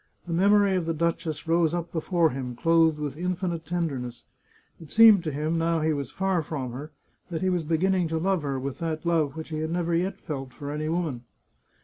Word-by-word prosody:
The 170 - -4
memory 200 +2 +4
of 175 -3 -1
the 165 - 0
duchess 165 -1 -2
rose 165 0 +2
up 170 -1 -4
before 165 -1 +1
him, 125 -2 -5
clothed 165 +1 +3
with 145 -2 -4
infinite 175 -2 -2
tenderness. 135 -9 -3 0.6
It 160 - -11
seemed 220 -5 +7
to 155 - -1
him, 155 +3 -1
now 165 0 +1
he 155 0 +2
was 140 -3 -3
far 190 +1 0
from 140 -5 -4
her, 140 +5 -7 0.4
that 170 0 -3
he 185 - +2
was 180 -1 +1
beginning 175 +3 +1
to 160 0 -2
love 185 +1 +1
her 140 -2 -2
with 135 0 -5
that 160 -1 -3
love 160 -5 +1
which 160 - -6
he 155 -1 -3
had 160 0 -2
never 170 0 -1
yet 180 +4 0
felt 135 -4 -6
for 145 0 -6
any 155 +1 -2
woman. 160 -8 -2
165 Hz, 215 wpm, -26 LUFS, 150-175 Hz, 0.6 s, seemed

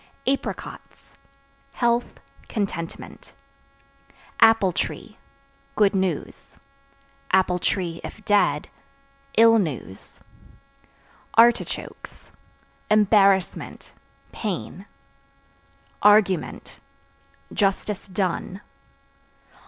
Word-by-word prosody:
Apricots 275 +1 -5 0.5
Health, 240 0 0 0.3
contentment. 185 -6 -5 1.1
Apple 225 -4 +5
Tree - - -5 0.6
Good 210 -1 +3
news; 190 -2 -3 0.7
(if 180 +1 -1
dead) 205 -1 +2 0.7
ill 225 0 +7
news. 140 - -6 1.2
Artichokes 235 +1 +1 0.6
Embarrassment, 200 -3 +2 0.4
pain. 195 -1 -5 1.1
Argument 205 -3 +2 0.7
Justice 200 0 -1
done. 190 0 -3
200 Hz, 50 wpm, -23 LUFS, 185-215 Hz, 1.2 s, ill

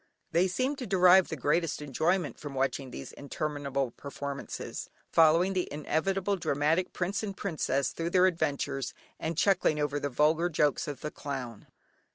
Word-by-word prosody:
They 170 +3 +3
seem 255 +10 0
to 250 - -5
derive 185 -1 +6
the 160 - -4
greatest 155 +3 0
enjoyment 155 +4 0
from 145 -2 -7
watching 135 0 -1
these - - -8
interminable 140 -3 -3
performances, 140 +1 -6 0.2
following 165 +4 +5
the 185 -1 -1
inevitable 190 +6 0
dramatic 160 +2 +1
"Prince 190 +3 -2
and 200 -3 -5
Princess" 140 -7 -1
through 165 0 -3
their 180 +1 +5
adventures, 140 -6 -1 0.2
and 160 0 -3
chuckling 180 -5 +3
over 145 0 0
the 145 - -2
vulgar 155 +6 +2
jokes 150 -4 +1
of 145 -2 -5
the 150 - -4
clown. 125 -6 -6
155 Hz, 155 wpm, -29 LUFS, 140-180 Hz, 0.2 s, derive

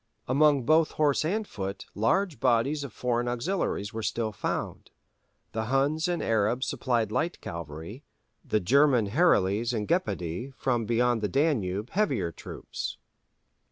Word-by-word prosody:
Among 140 0 +4
both 155 +5 +3
horse 150 -2 +2
and 205 +6 -1
foot 100 -1 -5
large 155 - +1
bodies 135 +4 +2
of 140 - -6
foreign 120 +1 -1
auxiliaries 120 - -2
were 110 - -3
still 110 0 -1
found: - - -4 0.6
the 110 0 -2
Huns 140 +6 +1
and 175 -1 -1
Arabs 115 +3 +1
supplied 115 -4 0
light 165 +10 -1
cavalry, 85 - -7 0.4
the 110 - +1
German 125 0 +3
Herules 115 - +3
and 105 -2 -2
Gepidæ 130 - -2
from 120 -5 -1
beyond 120 0 +2
the 105 - 0
Danube 115 - 0
heavier 135 - 0
troops. - - -6
120 Hz, 135 wpm, -28 LUFS, 105-150 Hz, 0.6 s, Among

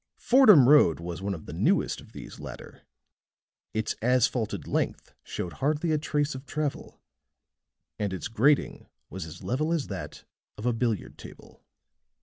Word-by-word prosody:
Fordham 215 - +6
Road 140 - +6
was 85 +1 -6
one 100 0 -2
of 80 - -11
the - - -8
newest - - +1
of - - -17
these - - -10
latter; - - -10 0.9
its 110 0 -2
asphalted 125 -1 +1
length - - -2
showed 90 - -5
hardly 155 +4 +1
a 155 - +2
trace 150 -1 -1
of 130 0 -8
travel 150 -2 -4 1.0
and 105 -2 -1
its 95 - -4
grading 130 +6 +1 0.2
was 90 -1 -6
as 80 - -11
level 155 +6 -1
as 165 -5 -1
that 95 -3 -7 0.3
of 105 - -7
a 120 - +2
billiard 115 -3 -2
table. - - -14
125 Hz, 150 wpm, -27 LUFS, 100-150 Hz, 1.0 s, Fordham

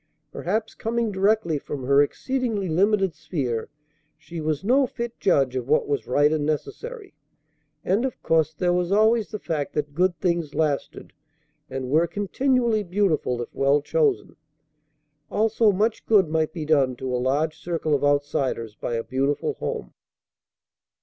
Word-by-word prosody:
Perhaps 215 +5 -2
coming 230 0 -1
directly 195 -5 +1
from 140 -1 -6
her 140 +2 +5
exceedingly 225 - -1
limited 195 +2 +2
sphere 125 -11 -3 0.5
she 160 +2 -8
was 155 +1 -1
no 260 +5 +3
fit 235 -1 -6
judge 135 -8 +2
of 125 -1 -3
what 150 +2 +2
was 140 -6 -2
right 145 +4 +3
and 155 -2 0
necessary. 410 - -4 0.7
And 200 +6 +2
of 265 - -3
course 160 -1 +2
there 175 +3 0
was 180 0 0
always 220 +2 +3
the 210 - -4
fact 155 -7 -3
that 145 -1 -2
good 180 +2 +1
things 170 -4 -1
lasted, 150 -3 -2 0.6
and 130 -1 -4
were 160 +3 +4
continually 235 +3 +1
beautiful 175 -10 0
if - - -13
well 140 +2 +3
chosen. 430 - 0 0.9
Also 220 0 +3
much 210 +4 -1
good 200 -7 +4
might 160 0 0
be 160 -4 -5
done 140 -5 +2
to 130 0 -3
a 125 - -1
large 145 +5 0
circle 165 -3 -2
of 145 - +1
outsiders 145 -6 0
by 115 - -4
a 115 - -2
beautiful 135 +2 -1
home. - - -4
160 Hz, 155 wpm, -24 LUFS, 145-210 Hz, 0.9 s, her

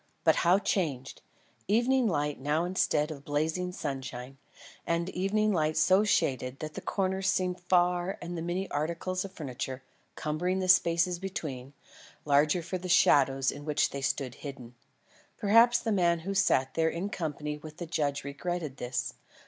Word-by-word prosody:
but - - +4
how 175 +2 +4
changed! 160 -10 -2 0.5
Evening 245 +4 +3
light 150 -5 -1
now 150 +5 0
instead 160 -4 +1
of 140 -3 -8
blazing 160 +5 -1
sunshine; 135 -4 -6 0.5
and 170 +1 0
evening 210 +3 +1
light 155 -2 0
so 185 +6 +4
shaded 130 - 0
that 155 +1 -6
the - - -6
corners 190 -1 -1
seemed 185 -1 0
far 180 +1 +1
and 175 0 -6
the 165 - -4
many 175 +3 -2
articles 170 +5 -2
of 195 - -8
furniture, 130 -5 -6 0.3
cumbering 175 +5 -1
the 185 -1 -1
spaces 170 -1 +3
between, 145 -8 -5 0.5
larger 150 +4 +3
for 180 +2 -4
the 185 +1 -6
shadows 135 -6 +4
in 145 - -9
which 150 0 +1
they 140 - -5
stood 135 -1 -1
hidden. 130 -3 -9 0.6
Perhaps 230 +4 +5
the 230 -1 -2
man 170 -4 +2
who 195 +4 -3
sat 135 -9 +2
there 160 0 +2
in 170 +4 -3
company 150 -4 -4
with 155 0 -11
the 175 - -5
judge 145 -3 -1
regretted 150 0 -4
this. 125 0 -3
165 Hz, 160 wpm, -29 LUFS, 145-185 Hz, 0.6 s, Perhaps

